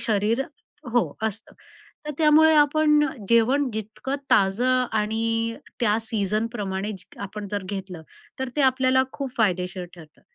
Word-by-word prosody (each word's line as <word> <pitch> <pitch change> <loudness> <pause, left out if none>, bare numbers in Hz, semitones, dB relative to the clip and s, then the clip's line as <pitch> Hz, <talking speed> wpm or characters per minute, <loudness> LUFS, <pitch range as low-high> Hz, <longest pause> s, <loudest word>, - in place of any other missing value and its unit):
शरीर 220 +2 +1 0.5
हो, 240 -1 +1
असतं. 220 -1 -4 0.5
तर 300 - -2
त्यामुळे 315 0 +6
आपण 300 0 +4 0.2
जेवण 250 +5 +3
जितकं 220 +5 -5 0.2
ताजं 245 +7 +3
आणि 225 +2 0 0.2
त्या 215 -2 +3
सीझनप्रमाणे 210 -2 -2 0.3
आपण 200 +1 -6
जर 205 -1 -2
घेतलं, 190 -4 -6 0.4
तर 265 0 -2
ते 295 - +2
आपल्याला 260 0 +3
खूप 275 -2 -5
फायदेशीर 185 -4 0
ठरतं. 160 -3 -16
225 Hz, 120 wpm, -24 LUFS, 205-260 Hz, 0.5 s, त्यामुळे